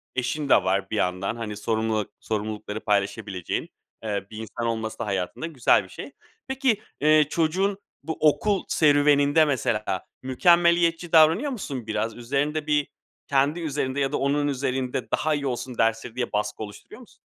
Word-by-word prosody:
eşin 135 +3 -2
de - - +8
var 95 +1 0
bir - - -3
yandan. 90 +1 -1
Hani, 110 -3 -5
sorumluluk 110 -1 -1
sorumlulukları 105 0 -4
paylaşabileceğin, 100 -3 -2 0.3
eee, 100 -3 -3
bir 110 - -8
insan 110 +1 -5
olması 110 -1 -3
da - - -2
hayatında 95 - -3
güzel 140 -7 +3
bir - - -15
şey. - - -9 0.4
Peki, 265 -5 +1 0.2
eee, 155 0 +5
çocuğun 185 +6 +1 0.3
bu 160 +2 -4
okul 190 +6 +2
serüveninde, 145 0 +4
mesela, 110 -8 -1 0.2
mükemmeliyetçi 170 +4 +3
davranıyor 165 - +5
musun 140 - -5
biraz? 110 +1 -2
Üzerinde 145 +5 -1
bir 150 -1 +2 0.4
kendi 140 +4 +2
üzerinde 140 -4 -2
ya 135 -1 0
da - - 0
onun 145 +1 +1
üzerinde 130 -2 -2
daha 155 - +1
iyi 140 -1 -2
olsun 125 -1 -4
dersleri 115 +1 0
diye 125 -1 -2
baskı 105 +1 -2
oluşturuyor 105 -1 -11
musun? - - -18
130 Hz, 155 wpm, -25 LUFS, 110-155 Hz, 0.4 s, de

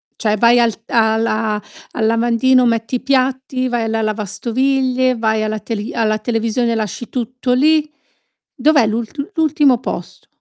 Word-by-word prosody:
Cioè 215 -1 0
vai 235 +2 +5
al 230 -2 +2
t - - -16
alla 220 -2 +1 0.3
al 220 - -2
lavandino, 240 +3 +3
metti 230 +1 0
i - - 0
piatti, 260 -1 0
vai 240 -2 -1
alla 225 0 -1
lavastoviglie, 250 +5 0
vai 220 -1 0
alla 215 0 -2
teli 215 -1 -5
alla 215 -1 0
televisione 230 +1 -1
e - - 0
lasci 220 +2 -4
tutto 250 +1 -2
lì. 305 +3 +3 0.7
Dov'è 285 -3 +3
l'ult 230 +6 -4 0.2
l'ultimo 295 -5 +3
posto? - - -7
235 Hz, 150 wpm, -17 LUFS, 220-255 Hz, 0.7 s, vai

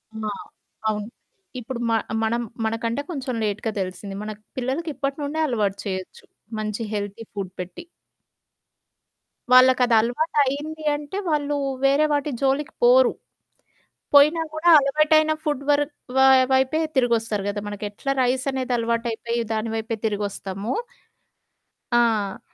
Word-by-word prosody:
ఆ! 215 -1 -3 0.6
అవును. 210 0 -2 0.5
ఇప్పుడు 245 +1 -6
మ - - +2 0.3
మనం 235 +2 0 0.2
మనకంటే 230 +3 -1
కొంచెం 260 -4 -4
లేట్‌గా 215 +2 -1
తెలిసింది. 190 +1 -5
మన‌క 215 0 -6 0.2
పిల్లలకి 265 +7 -2
ఇప్పటి 275 +2 -2
నుండే 290 +3 -3
అలవాటు 210 -6 0
చేయొచ్చు. 190 -2 -5 0.4
మంచి 215 +1 -3
హెల్తీ 205 +2 -4
ఫూడ్ 195 -3 -5
పెట్టి. 185 - -7 1.7
వాళ్ళకదలవాటయింది 260 +5 +3
అంటే, 295 +5 -6
వాళ్ళు 295 -1 0 0.3
వేరే 280 +3 +4
వాటి 290 0 0
జోలికి 275 +2 0
పోరు. - - +6 1.0
పోయినా 300 +3 +6
కూడా 315 +2 -2
అలవాటైన 305 +2 +3
ఫుడ్ 295 -3 -1
వర్ 290 0 +4 0.3
వ - - +1 0.4
వైపే 265 +4 +2 0.2
తిరిగొస్తారు 225 -5 +1
కదా! 205 0 -3
మనకెట్లా 205 +5 -4
రైసనేది 255 0 0
అలవాటైపోయి, 235 0 -1
దాని 220 +1 -2
వైపే 225 +1 -2
తిరిగొస్తామో 205 0 -3 1.2
ఆ! 225 -5 +2
245 Hz, 110 wpm, -23 LUFS, 215-285 Hz, 1.7 s, పోరు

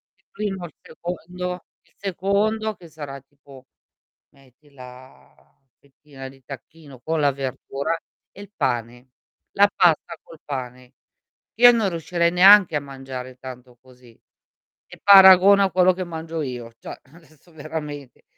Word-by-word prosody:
il - - -41
primo, 195 -3 -5
il 155 - -12
secondo, 180 +2 -7 0.2
il - - -34
secondo 205 +3 -1
che 170 - -16
sarà 145 -3 -9
tipo 135 -1 -19 0.7
metti 135 +2 -25
la 130 -1 -15 0.4
fettina 135 -1 -13
di 135 0 -18
tacchino 140 0 -13
con 160 +3 -2
la 145 -1 +3
verdura 135 +3 -4 0.4
e 200 - -15
il 200 - -12
pane. 120 -2 -3 0.4
La 205 +1 +4
pasta 170 -4 +1
col 165 - -16
pane. 125 -2 -8 0.6
Io 245 +1 +8
non 225 -4 0
riuscirei 170 +1 -1
neanche 190 -2 +6
a - - 0
mangiare 130 -2 -9
tanto 125 -1 -12
così 125 -3 -21 0.7
e - - -15
paragona 195 0 +7
a 190 - 0
quello 185 0 +3
che 185 0 -5
mangio 165 -1 -6
io, 125 -4 -7
cioè, - - -10
adesso 160 -1 -22
veramente. 150 -3 -8
150 Hz, 135 wpm, -22 LUFS, 130-180 Hz, 0.7 s, Io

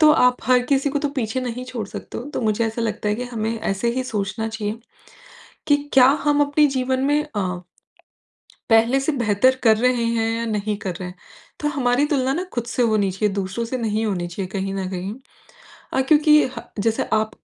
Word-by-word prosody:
तो 310 -1 +7
आप 250 -4 +4
हर 250 +1 +5
किसी 275 +1 +2
को 290 - 0
तो 290 - -1
पीछे 255 -3 -2
नहीं 250 0 -4
छोड़ 240 -5 -5
सकते - - -7
हो। 245 - -6
तो - - -1
मुझे 220 0 +1
ऐसा 225 +1 -3
लगता 210 -1 -2
है 210 - +1
कि 245 - -4
हमें 225 -2 -3
ऐसे 200 +4 -1
ही 260 - 0
सोचना 215 -1 -3
चाहिए 220 0 -4 0.9
कि 290 - +6 0.2
क्या 255 -2 +7 0.2
हम 290 -1 +3
अपने 290 +1 +3
जीवन 260 0 0
में 295 +1 +3
अ, 205 - +1 1.3
पहले 230 +4 +4
से 285 +3 0
बेहतर 240 0 +3
कर 220 -2 +5
रहे 245 +1 +2
हैं 230 -1 0
या 230 - -2
नहीं 210 -1 -1
कर 185 -3 -4
रहे 180 - -4
हैं? 180 - -10 0.5
तो 295 - 0
हमारी 270 -2 +1
तुलना 270 -3 +1
ना 350 +5 -2
खुद 240 - -1
से 245 +1 -1
होनी 215 -4 +2
चाहिए, 195 +2 -1
दूसरों 200 +4 -2
से 255 +3 -3
नहीं 220 -1 -1
होनी 180 -4 -1
चाहिए 185 +2 -4
कहीं 195 0 -2
न 190 -1 -3
कहीं 190 +2 -4 0.8
अ, 265 - +2
क्योंकि 300 +2 +5
ह - - -10 0.2
जैसे 225 +1 0
आप 220 0 +2
230 Hz, 210 wpm, -22 LUFS, 210-260 Hz, 1.3 s, तो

